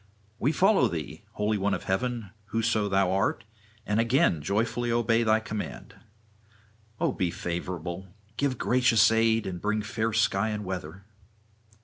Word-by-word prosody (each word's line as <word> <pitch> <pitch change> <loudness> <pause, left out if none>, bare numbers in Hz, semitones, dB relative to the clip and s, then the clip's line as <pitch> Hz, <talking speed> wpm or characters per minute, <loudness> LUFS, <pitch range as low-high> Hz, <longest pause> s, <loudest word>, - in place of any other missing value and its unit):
We 140 - +2
follow 190 - +4
thee, 80 -7 -6
holy 105 0 0
one 100 +1 +1
of - - -7
heaven, 115 +1 -2
whoso 110 -1 0
thou 95 -1 +2
art, 100 +4 0 0.4
and 105 +2 0
again 115 - +3
joyfully 115 +7 -1
obey 115 -1 +2
thy 110 -1 +3
command. 110 -1 -6 1.1
O - - +1
be 90 -4 -1
favourable; 90 +1 -5 0.3
give 130 0 0
gracious 120 -4 +4
aid 115 -1 +2
and 90 -2 -5
bring 105 0 0
fair 110 +1 -1
sky 110 -1 +1
and 105 -1 -4
weather.' 90 0 -6
110 Hz, 140 wpm, -27 LUFS, 95-115 Hz, 1.1 s, follow